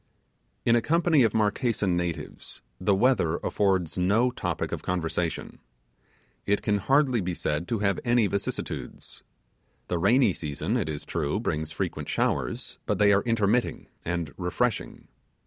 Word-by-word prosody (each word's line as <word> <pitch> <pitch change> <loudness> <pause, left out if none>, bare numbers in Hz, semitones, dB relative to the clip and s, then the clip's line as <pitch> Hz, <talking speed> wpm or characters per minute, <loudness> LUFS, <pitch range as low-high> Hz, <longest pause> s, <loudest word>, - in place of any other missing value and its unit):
In 115 - +5
a 120 - +3
company 165 +1 +3
of 115 -4 +3
Marquesan 105 -3 +1
natives 85 -1 -4 0.2
the 100 +2 +2
weather 95 -7 +3
affords 95 -4 0
no 110 +8 +3
topic 90 -9 -3
of - - -3
conversation. 85 -1 -2 0.9
It 100 0 +1
can 105 -2 +1
hardly 130 +2 +3
be 90 -1 -2
said 75 +2 -2
to 115 - -1
have 100 - +1
any 120 -2 +3
vicissitudes. 100 0 -4 0.7
The 90 - 0
rainy 115 +3 +4
season, 80 - -3
it 110 -10 0
is 75 -2 -4
true, 75 -4 -1
brings 80 +1 -2
frequent - - -3
showers, - - -1
but - - +1
they 100 -1 +5
are 100 - +4
intermitting 115 +1 0
and 85 -4 -3
refreshing. 95 +6 -2
100 Hz, 145 wpm, -27 LUFS, 85-115 Hz, 0.9 s, In